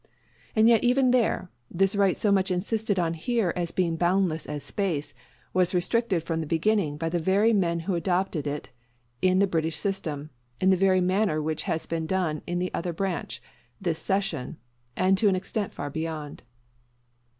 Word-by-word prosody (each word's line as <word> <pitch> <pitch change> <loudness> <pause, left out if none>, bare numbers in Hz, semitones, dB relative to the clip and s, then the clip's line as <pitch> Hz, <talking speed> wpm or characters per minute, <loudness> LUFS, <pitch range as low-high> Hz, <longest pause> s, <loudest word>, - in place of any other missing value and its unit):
And 220 0 +5
yet 230 -1 +5
even 250 +1 +4
there, 230 -7 +1 0.2
this 195 +3 +2
right 200 -2 +3
so 210 - +2
much 195 0 +2
insisted 205 +3 -1
on 170 -2 +1
here 195 +2 0
as 175 -1 -1
being 170 -2 0
boundless 175 -2 +1
as 145 -2 -4
space, 165 -2 -2 0.4
was 185 0 +2
restricted 190 -1 +1
from 165 -1 -2
the 155 - -5
beginning 165 -2 +1
by 165 +1 -2
the 170 +1 0
very 200 +7 +3
men 170 -4 +1
who 185 +3 -2
adopted 175 -3 -1
it 145 +1 -4 0.5
in 185 0 +3
the 200 - +5
British 160 -3 -1
system, 155 -6 -3 0.3
in 190 0 +4
the - - +5
very 185 0 +3
manner 185 -2 +1
which 155 0 -2
has 160 - -1
been 165 -1 -3
done 170 -4 -1
in 175 0 -1
the 180 +1 -2
other 175 0 -2
branch, 165 - -3 0.4
this 170 -4 -1
session; 190 -9 -2 0.4
and 190 +1 +3
to 215 - +4
an 190 - +2
extent 195 +2 -3
far 145 0 -5
beyond. 160 -1 -5
180 Hz, 180 wpm, -26 LUFS, 160-195 Hz, 0.5 s, And